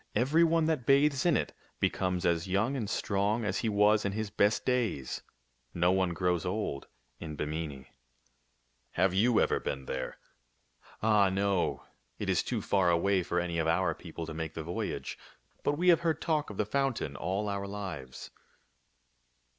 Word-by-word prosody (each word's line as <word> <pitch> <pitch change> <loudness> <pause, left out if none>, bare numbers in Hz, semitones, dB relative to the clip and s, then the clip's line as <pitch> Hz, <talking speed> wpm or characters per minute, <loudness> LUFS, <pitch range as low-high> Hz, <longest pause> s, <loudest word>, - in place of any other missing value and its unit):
Every 140 +9 +4
one 165 -1 +3
that 155 -7 -1
bathes 140 +2 +4
in 170 - +4
it - - -3 0.3
becomes 90 -2 0
as 85 +1 +1
young 105 +8 +1
and 110 -7 -3
strong 105 +2 0
as 100 -2 -1
he 115 - 0
was 105 +1 +4
in 100 - -1
his 110 0 -3
best 105 0 +2
days. 115 - -1 0.5
No 90 +1 +3
one 95 -1 +2
grows 90 -1 0
old 90 -7 -3 0.3
in 80 -2 -6
Bimini." 75 -3 -4 0.6
" - - -44
Have 90 0 +3
you 110 +4 +3
ever - - +2
been 70 0 -4
there? - - -4 0.3
" - - -43
" - - -23
Ah, 105 -3 +4
no. 95 -1 0 0.3
It - - -1
is - - +2
too - - -3
far 95 -3 +2
away 95 +3 +2
for 85 0 -1
any 85 -1 -2
of 80 - 0
our 85 +1 +2
peo 85 +1 -11
ple 85 - -4
to 80 - -7
make 80 0 -5
the 80 - -4
voyage. 85 +3 -4 0.4
But 145 - +1
we 180 +2 +3
have 170 - +6
heard 165 -2 0
talk 155 -3 0
of 105 - -8
the 105 - +1
fountain 120 - -1
all 95 +7 -2
our 100 -1 -3
lives." 90 -11 -7
100 Hz, 185 wpm, -30 LUFS, 85-110 Hz, 0.6 s, have